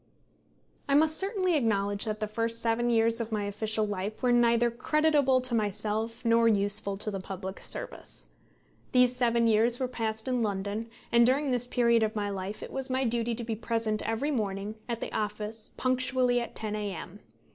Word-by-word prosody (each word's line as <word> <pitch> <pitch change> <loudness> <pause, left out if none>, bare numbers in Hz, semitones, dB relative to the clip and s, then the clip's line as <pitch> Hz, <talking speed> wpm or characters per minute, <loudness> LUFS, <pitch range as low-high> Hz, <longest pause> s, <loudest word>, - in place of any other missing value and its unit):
I 275 - +4
must 315 +1 +4
certainly 385 -3 +1
acknowledge 205 -6 +1
that 215 -1 -3
the 215 - -2
first 230 +2 -1
seven 235 +1 +1
years 230 0 +2
of 225 0 -5
my 210 -2 -1
official 215 +2 +1
life 205 +3 -5
were 250 - +3
neither 235 0 +3
creditable 285 0 +2
to 255 -1 +2
myself 215 +2 -1
nor 230 0 +4
useful 205 -1 +1
to 215 +1 -1
the 195 - -4
public 190 0 -7
service. - - -2 0.7
These 250 -1 +5
seven 235 -1 +2
years 230 +2 +3
were 260 - 0
passed 220 -2 -4
in 250 -2 0
London, 205 +2 -3 0.2
and 235 0 +5
during 270 +3 +2
this 245 -1 0
period 235 -2 +3
of 220 +1 0
my 205 -1 -2
life 195 +1 -5
it - - -8
was 265 0 -3
my 260 +1 0
duty 235 -1 0
to 235 - -5
be 225 -1 -3
present 225 -1 -1
every 235 +7 -1
morning 205 -4 -2 0.2
at 235 -1 -3
the - - -5
office 215 +1 -4
punctually 255 -1 +1
at 235 - -7
10 215 -1 -3
A.M. 200 -2 -6
230 Hz, 185 wpm, -28 LUFS, 210-245 Hz, 0.7 s, These